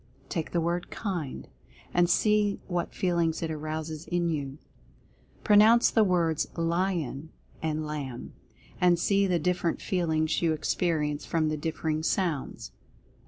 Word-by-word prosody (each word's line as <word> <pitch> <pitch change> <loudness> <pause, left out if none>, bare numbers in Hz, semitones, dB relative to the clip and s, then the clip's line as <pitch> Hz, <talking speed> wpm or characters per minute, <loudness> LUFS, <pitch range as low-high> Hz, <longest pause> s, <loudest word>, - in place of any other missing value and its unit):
Take 165 -4 -3
the 170 - 0
word 170 +1 -1
"KIND," 175 - -4 0.5
and 175 0 +3
see 210 +1 +2
what 175 -2 -2
feelings 170 -3 0
it 160 - -2
arouses 155 +1 -5
in 175 -1 0
you. 140 -3 -3 0.9
Pronounce 215 +3 +6
the 220 - +4
words 170 -5 +1
"LION" 165 -4 -1 0.3
and 155 -1 -2
"LAMB," 140 -5 -5 0.5
and 175 -1 +4
see 200 +3 +2
the 180 -2 +2
differ 175 +2 0
ent - - -3
feelings 160 -4 0
you 165 -2 +2
experience 155 -2 -1
from 160 -2 +1
the 155 - -1
differing 155 0 -2
sounds. 165 -4 -2
165 Hz, 135 wpm, -28 LUFS, 155-180 Hz, 0.9 s, Pronounce